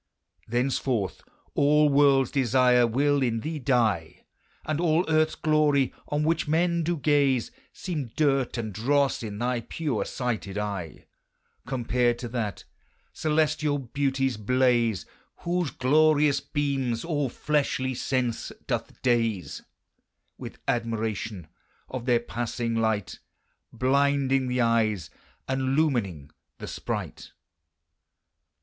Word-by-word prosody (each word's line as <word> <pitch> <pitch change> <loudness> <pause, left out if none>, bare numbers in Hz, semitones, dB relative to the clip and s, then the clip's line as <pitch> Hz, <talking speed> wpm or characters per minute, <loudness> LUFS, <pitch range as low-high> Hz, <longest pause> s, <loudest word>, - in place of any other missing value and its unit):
Thenceforth 120 -3 -1 0.3
all 150 +1 +4
worlds 140 -2 +4
desire 125 -2 +4
will 140 +4 +2
in 115 -3 0
thee 155 +2 -4
dye, 110 - 0 0.4
And 155 +1 -1
all 170 +1 +2
earthes 155 0 +2
glorie, 150 -4 +2
on 150 +1 -1
which 160 0 +1
men 170 +2 +2
do 170 +1 -1
gaze, 140 -4 +2 0.2
Seeme 155 -9 -4
durt 135 -5 +1
and 110 -3 -4
drosse 135 +7 +1
in 105 -3 -5
thy 120 +2 0
pure 135 -1 -2
sighted 115 -6 -3
eye, 100 -6 -4 0.6
Compared 120 -1 +1
to 120 - -5
that 110 -4 -3 0.5
celestiall 155 -1 +1 0.2
beauties 135 -3 0
blaze, 120 -3 +2 0.4
Whose 175 -2 0
glorious 145 +2 +3
beames 135 -5 -2
all 145 -5 -1
fleshly 135 -2 -1
sense 125 -2 -2
doth - - -3
daze 115 -6 0 0.7
With - - -9
admiration 110 -5 -2 0.4
of 130 -2 -6
their 120 -2 +4
passing 120 0 -3
light, 110 -3 -1 0.5
Blinding 135 +1 +2
the 125 0 0
eyes, 110 -6 +1 0.4
and 130 +1 0
lumining 100 - 0 0.3
the - - -7
spright. - - -5
130 Hz, 110 wpm, -26 LUFS, 115-145 Hz, 0.7 s, all